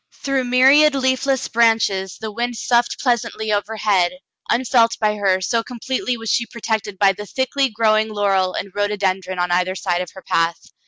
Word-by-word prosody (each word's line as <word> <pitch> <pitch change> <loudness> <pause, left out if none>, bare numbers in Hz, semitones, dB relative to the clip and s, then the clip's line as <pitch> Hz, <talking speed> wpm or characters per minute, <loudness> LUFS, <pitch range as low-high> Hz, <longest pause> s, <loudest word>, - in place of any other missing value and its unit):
Through 275 -2 0
myriad 270 +4 +5
leafless 265 0 0
branches 220 -5 +1
the 220 -1 -5
wind 240 +2 -3
soughed 240 +1 +1
pleasantly 220 -4 -1
overhead, 205 -2 0 0.4
unfelt 235 -1 +2
by 215 -1 +1
her, 190 -2 +1
so 230 +5 0
com 245 +1 -10
pletely 255 0 -2
was 225 -1 -3
she 235 - 0
protected 220 -3 -4
by 195 0 +4
the 210 +2 -9
thickly 265 +2 0
growing 215 -1 +1
laurel 195 -3 0
and 195 - -5
rhododendron 195 -2 -1
on 175 0 -1
either 180 +1 +1
side 180 -2 -1
of 180 - -5
her 190 - -11
path. 165 0 0
220 Hz, 170 wpm, -20 LUFS, 195-245 Hz, 0.4 s, myriad